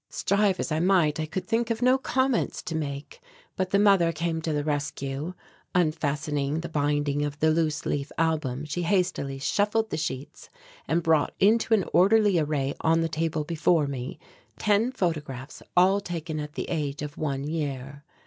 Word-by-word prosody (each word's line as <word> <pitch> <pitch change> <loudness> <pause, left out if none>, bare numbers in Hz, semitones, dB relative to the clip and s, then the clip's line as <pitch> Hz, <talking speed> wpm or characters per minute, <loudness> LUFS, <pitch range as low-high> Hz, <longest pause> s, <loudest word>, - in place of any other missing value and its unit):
Strive 200 -1 +1
as - - -2
I 155 - +1
might 170 -4 +3
I 155 - -2
could 185 +4 -4
think 230 +1 0
of 230 +1 -1
no 255 +1 +4
comments 260 -2 0
to 165 - -5
make, 140 -2 -5 0.3
but 185 -1 -1
the 200 - +3
mother 195 -5 +5
came 165 0 -2
to 160 - -2
the 150 -1 0
rescue. 145 +2 -3 0.4
Unfastening 150 -3 0
the 170 - -6
binding 145 -1 0
of 145 0 -3
the 155 +1 +3
loose 155 -2 0
leaf 140 0 -2
album 150 -4 0
she 155 +4 -3
hastily 175 -7 0
shuffled 210 +9 0
the - - -1
sheets 145 -3 -5 0.4
and 165 +1 +1
brought 160 -2 +2
into 220 +3 +4
an 195 - 0
orderly 205 0 +5
array 145 -3 0
on 165 0 +3
the 165 - 0
table 160 0 -1
before 165 0 +2
me 135 -2 -5 0.4
ten 210 +4 +2
photographs 150 - -3 0.2
all 190 +3 +5
taken 165 -4 -4
at 150 0 -6
the - - -4
age 150 -3 -2
of 150 0 -6
one 140 -3 -2
year. 145 -2 -4
160 Hz, 175 wpm, -26 LUFS, 145-185 Hz, 0.4 s, mother